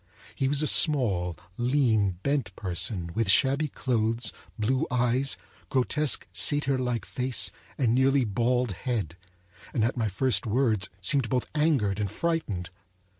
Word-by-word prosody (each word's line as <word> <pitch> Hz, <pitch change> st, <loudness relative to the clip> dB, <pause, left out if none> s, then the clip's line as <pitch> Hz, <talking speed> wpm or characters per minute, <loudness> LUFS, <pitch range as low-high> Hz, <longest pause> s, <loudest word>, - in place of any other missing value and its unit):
He 135 Hz, -, -1 dB
was 145 Hz, +2 st, 0 dB
a -, -, +1 dB
small, 100 Hz, -, +2 dB, 0.2 s
lean, 120 Hz, -6 st, +2 dB
bent 135 Hz, -10 st, -1 dB
person, 90 Hz, -1 st, -2 dB
with 115 Hz, -2 st, 0 dB
shabby 135 Hz, +8 st, +3 dB
clothes, 115 Hz, -3 st, -1 dB, 0.2 s
blue 125 Hz, +4 st, 0 dB
eyes, 125 Hz, +2 st, +1 dB, 0.3 s
grotesque, 135 Hz, +3 st, +1 dB
satyrlike 130 Hz, -5 st, +1 dB
face, 125 Hz, 0 st, -2 dB, 0.3 s
and 120 Hz, -5 st, +2 dB
nearly 135 Hz, +1 st, +3 dB
bald 120 Hz, +3 st, 0 dB
head; 100 Hz, -, -3 dB, 0.6 s
and 115 Hz, -, +2 dB
at 120 Hz, +3 st, 0 dB
my 115 Hz, -2 st, +1 dB
first 115 Hz, +2 st, +1 dB
words 110 Hz, -4 st, +1 dB
seemed 120 Hz, +5 st, +1 dB
both 125 Hz, +1 st, 0 dB
angered 140 Hz, -11 st, +1 dB
and 105 Hz, -1 st, -1 dB
frightened. 105 Hz, -, -2 dB
125 Hz, 130 wpm, -27 LUFS, 105-135 Hz, 0.6 s, shabby